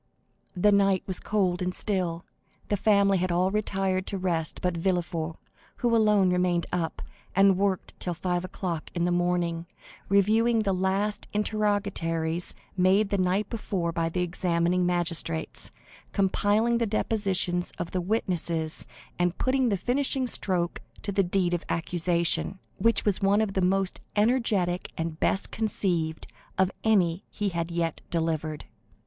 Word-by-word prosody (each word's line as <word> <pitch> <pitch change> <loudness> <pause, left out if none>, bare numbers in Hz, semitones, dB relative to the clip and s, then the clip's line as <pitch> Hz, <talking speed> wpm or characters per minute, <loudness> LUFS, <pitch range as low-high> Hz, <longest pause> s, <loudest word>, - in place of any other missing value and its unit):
The 205 +3 +4
night 195 -2 +3
was 185 -2 -1
cold 185 -4 0
and 180 0 -2
still; 180 -5 -1 0.4
the 205 - +2
family 200 -1 +3
had 185 0 0
all 180 +2 +2
retired 195 -3 -1
to 200 - -2
rest 170 -4 -1
but 180 -1 -1
Villefort, 170 -2 -1 0.4
who 235 -1 +1
alone 210 -4 +4
remained 180 -1 +1
up, 165 -2 -2 0.3
and 195 0 +6
worked 195 -1 -1
till 175 -1 -2
five 175 +1 -1
o'clock 180 -3 -4
in 170 - 0
the 175 - +1
morning, 175 -1 0 0.4
reviewing 220 +3 +3
the 195 -2 +1
last 190 +3 -1
interrogatories 200 -6 -1 0.2
made 195 +3 +3
the 200 - +1
night 185 +3 +1
before 190 -6 -2
by 165 0 -1
the 180 +2 -1
examining 175 0 +1
magistrates, 170 - 0 0.4
compiling 205 +4 +2
the 230 - +1
depositions 195 -4 0
of 175 - -4
the 185 - -1
witnesses, 175 -5 -1 0.3
and 175 0 +1
putting 260 -1 +2
the 200 - +1
finishing 260 +5 0
stroke 180 -7 0 0.2
to 200 - -2
the 195 - +2
deed 180 -1 +1
of 175 - -1
accusation, 170 +2 +1 0.2
which 230 +4 +2
was 205 -3 +1
one 200 +1 +4
of 215 -3 0
the 190 - +1
most 190 +1 0
energetic 210 -6 +1
and 160 -1 -3
best 195 - +1
conceived 175 -7 -1 0.3
of 190 0 +3
any 185 -5 +2
he 205 -2 -2
had 170 -2 -3
yet 170 -1 -2
delivered. 160 -2 -2
185 Hz, 145 wpm, -27 LUFS, 175-205 Hz, 0.4 s, and